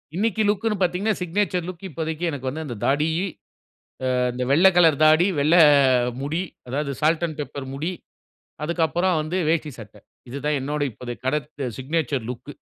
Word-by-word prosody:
இன்னைக்கு 220 Hz, +2 st, 0 dB
லுக்னு 210 Hz, +1 st, 0 dB
பாத்தீங்கன்னா, 185 Hz, +5 st, +1 dB
signature 180 Hz, 0 st, -1 dB
look 185 Hz, 0 st, -8 dB
இப்போதைக்கு 160 Hz, +1 st, -4 dB
எனக்கு 135 Hz, -2 st, -5 dB
வந்து 160 Hz, +4 st, -5 dB
அந்த 125 Hz, -5 st, -5 dB
தாடி 150 Hz, +3 st, +2 dB, 1.1 s
ஆ -, -, +1 dB, 0.2 s
இந்த 125 Hz, +1 st, -3 dB
வெள்ள 160 Hz, +7 st, +5 dB
கலர் 165 Hz, -4 st, +6 dB
தாடி, 155 Hz, +3 st, +6 dB
வெள்ள 150 Hz, +4 st, +3 dB, 0.7 s
முடி 160 Hz, +5 st, -1 dB, 0.3 s
அதாவது 140 Hz, +2 st, -2 dB
சால்ட் 160 Hz, +2 st, +2 dB
அண்ட் 155 Hz, -2 st, -8 dB
பேப்பர் 140 Hz, -2 st, -6 dB
முடி. 160 Hz, +6 st, -3 dB, 0.7 s
அதுக்கு 170 Hz, +2 st, -1 dB
அப்புறம் 175 Hz, 0 st, +1 dB
வந்து 155 Hz, +4 st, -3 dB
வேஷ்டி 160 Hz, -2 st, 0 dB
சட்ட. 110 Hz, -2 st, -11 dB, 0.3 s
இது 130 Hz, +4 st, -5 dB
தான் 150 Hz, -1 st, +2 dB
என்னுடைய 145 Hz, 0 st, -2 dB
இப்போதைய 120 Hz, +3 st, -7 dB
கடத் 150 Hz, +2 st, -1 dB, 0.3 s
சிக்னேச்சர் 135 Hz, -3 st, -2 dB
லுக் 125 Hz, +3 st, -7 dB
155 Hz, 160 wpm, -23 LUFS, 140-175 Hz, 1.1 s, கலர்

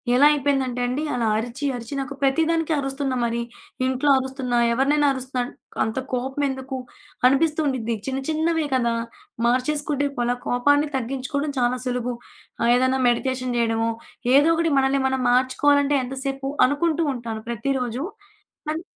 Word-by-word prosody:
ఎలా 270 Hz, +3 st, +6 dB
అయిపోయిందంటే 270 Hz, -4 st, 0 dB
అండి 260 Hz, +5 st, -2 dB
అలా 240 Hz, -2 st, 0 dB
అరిచి, 240 Hz, +6 st, -4 dB
అరిచి 235 Hz, +2 st, -7 dB
నాకు 275 Hz, +1 st, -4 dB
ప్రతిదానికి 325 Hz, +4 st, +1 dB
అరుస్తున్నా 270 Hz, -1 st, -2 dB
మరి 235 Hz, 0 st, 0 dB, 0.4 s
ఇంట్లో 260 Hz, +2 st, +1 dB
అరుస్తున్నా, 260 Hz, -2 st, -2 dB, 0.2 s
ఎవరినైనా 290 Hz, +4 st, +3 dB
అరుస్తున్నా 260 Hz, -1 st, -3 dB, 0.4 s
అంత 220 Hz, +2 st, -3 dB, 0.2 s
కోపం 265 Hz, +3 st, -1 dB
ఎందుకు 265 Hz, 0 st, -5 dB, 0.5 s
అనిపిస్తూ 300 Hz, +4 st, +2 dB
ఉండిద్ది. 235 Hz, -4 st, -1 dB
చిన్న 270 Hz, 0 st, -2 dB
చిన్నవే 320 Hz, 0 st, +1 dB
కదా! 235 Hz, -2 st, +1 dB, 0.5 s
మార్చేసుకుంటే 285 Hz, +3 st, +1 dB
పోలా 240 Hz, 0 st, +1 dB
కోపాన్ని 285 Hz, +4 st, +3 dB
తగ్గించుకోవడం 270 Hz, +3 st, -2 dB
చాలా 245 Hz, +1 st, +1 dB
సులుభు. 250 Hz, -1 st, -1 dB, 0.5 s
ఆహ్, 235 Hz, -, +3 dB
ఏదైనా 260 Hz, +1 st, +2 dB
మెడికేషన్ 255 Hz, +1 st, -1 dB
జేయడమో, 225 Hz, -1 st, +1 dB, 0.5 s
ఏదో 290 Hz, +3 st, +6 dB
ఒకటి 330 Hz, -1 st, +1 dB
మనల్ని 270 Hz, 0 st, +2 dB
మనం 265 Hz, 0 st, -1 dB
మార్చుకోవాలంటే 285 Hz, +3 st, +3 dB
ఎంతసేపు 270 Hz, +1 st, -4 dB, 0.2 s
అనుకుంటూ 315 Hz, +3 st, +1 dB
ఉంటాను 225 Hz, -2 st, -6 dB
ప్రతిరోజు. 250 Hz, +2 st, -2 dB, 0.7 s
అది 320 Hz, +2 st, -4 dB
265 Hz, 135 wpm, -23 LUFS, 245-285 Hz, 0.7 s, ఎలా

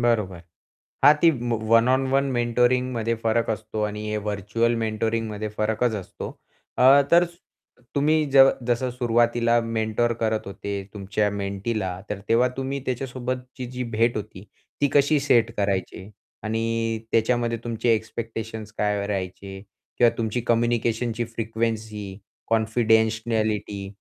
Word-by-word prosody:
बरोबर 105 Hz, -7 st, +1 dB, 0.7 s
हां 145 Hz, -, +10 dB
ती 170 Hz, -, +6 dB, 0.4 s
वन 115 Hz, +1 st, +5 dB
ऑन 130 Hz, +1 st, +2 dB
वन 135 Hz, 0 st, +3 dB
मेंटोरिंगमध्ये 120 Hz, -1 st, +1 dB
फरक 115 Hz, +1 st, +1 dB
असतो 110 Hz, 0 st, -3 dB
आणि 105 Hz, 0 st, -2 dB
हे 110 Hz, -, -1 dB
व्हर्चुअल 105 Hz, +3 st, -1 dB
मेंटोरिंगमध्ये 110 Hz, -1 st, -2 dB
फरकच 110 Hz, +2 st, 0 dB
असतो. 100 Hz, -4 st, -6 dB, 0.5 s
अ, 135 Hz, +3 st, +7 dB
तर 170 Hz, +1 st, +6 dB, 0.7 s
तुम्ही 155 Hz, +2 st, +3 dB
ज 135 Hz, -1 st, +9 dB, 0.2 s
जसं 125 Hz, +1 st, 0 dB
सुरुवातीला 120 Hz, -1 st, +2 dB
मेंटर 115 Hz, +1 st, 0 dB
करत 110 Hz, -1 st, 0 dB
होते 100 Hz, 0 st, -5 dB
तुमच्या 105 Hz, +1 st, -1 dB
मेंटीला 100 Hz, 0 st, -3 dB, 0.2 s
तर 105 Hz, -1 st, -3 dB
तेव्हा 120 Hz, +2 st, +4 dB
तुम्ही 135 Hz, +1 st, -3 dB
त्याच्यासोबतची 125 Hz, 0 st, -4 dB
जी 125 Hz, 0 st, -4 dB
भेट 115 Hz, +2 st, +2 dB
होती 105 Hz, -2 st, -7 dB, 0.4 s
ती 145 Hz, -, +3 dB
कशी 145 Hz, +1 st, +4 dB
सेट 125 Hz, -5 st, +3 dB
करायचे 95 Hz, -1 st, -2 dB, 0.3 s
आणि 115 Hz, +1 st, -1 dB
त्याच्यामध्ये 115 Hz, 0 st, +1 dB
तुमचे 115 Hz, 0 st, +1 dB
एक्स्पेक्टेशन्स 110 Hz, -1 st, -5 dB
काय 105 Hz, -1 st, 0 dB
राहायचे 95 Hz, 0 st, -5 dB, 0.4 s
किंवा 120 Hz, -1 st, +6 dB
तुमची 115 Hz, +1 st, -1 dB
कम्युनिकेशनची 120 Hz, 0 st, +1 dB
फ्रिक्वेन्सी, 110 Hz, -3 st, -4 dB, 0.3 s
कॉन्फिडेन्शियलिटी 110 Hz, -2 st, +1 dB
115 Hz, 120 wpm, -24 LUFS, 105-120 Hz, 0.7 s, हां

